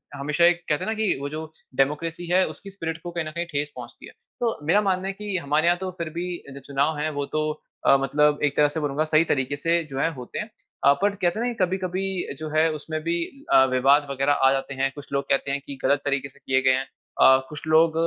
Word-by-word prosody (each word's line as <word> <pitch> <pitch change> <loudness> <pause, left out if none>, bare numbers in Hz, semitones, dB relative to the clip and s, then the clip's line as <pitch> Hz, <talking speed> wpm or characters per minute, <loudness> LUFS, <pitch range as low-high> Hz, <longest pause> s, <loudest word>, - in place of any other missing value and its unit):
हमेशा 150 +4 +2
एक 175 0 +3
कहते 150 -2 +1
है - - -3
ना - - +1
कि 215 -2 +1
वो 140 - -3
जो 155 +2 -5 0.3
डेमोक्रेसी 160 +6 0
है 185 +1 +4
उसकी 200 - -10
स्पिरिट 165 -4 -4
को 175 - -5
कहीं 170 -2 -3
न 155 - -5
कहीं 170 +2 -3
ठेस 145 0 -2
पहुँचती - - -10
है। - - -12 0.3
तो 235 -2 0
मेरा 200 +6 +5
मानना 190 -2 0
है 195 - -2
कि 205 -1 -3
हमारे 155 0 +1
यहाँ 175 0 +4
तो 190 0 -4
फिर 165 - -2
भी 180 - -2 0.3
जो 140 - -8
चुनाव 140 +3 -1
है 150 +1 -1
वो 145 -1 -2
तो 155 +1 -1 0.4
अ, 135 - +7
मतलब 150 +2 +2
एक 145 -1 +1
तरह 150 - +6
से 160 - -4
बोलूँगा 145 0 0
सही 155 0 +3
तरीके 135 0 0
से 165 +3 +1
जो 135 -3 -6
है 165 - +2
होते 125 -4 -7
हैं। 210 - -4 0.4
अ, 140 - +8
बट 205 0 +2
कहते 175 +3 +1
हैं 240 - 0
ना 245 - -1
कभी-कभी 185 0 -2 0.4
जो 155 0 -5
है 155 +1 +3
उसमें 155 +1 -4
भी 170 +1 0 0.4
अ, 130 - +8
विवाद 140 +3 +4
वगैरह 140 +1 +1
आ 135 -1 +4
जाते 135 0 -2
हैं। 135 0 0
कुछ 145 - -11
लोग 140 0 +1
कहते 140 0 +1
हैं 140 0 -1
कि 140 - -7
गलत 140 +1 +3
तरीके 140 -1 -1
से 140 - -22
किए 130 0 +2
गए 130 0 +4
हैं। 130 +1 0 0.4
अ, 130 - +8
कुछ 150 +1 -8
लोग 160 +1 +5
155 Hz, 255 wpm, -24 LUFS, 140-175 Hz, 0.4 s, अ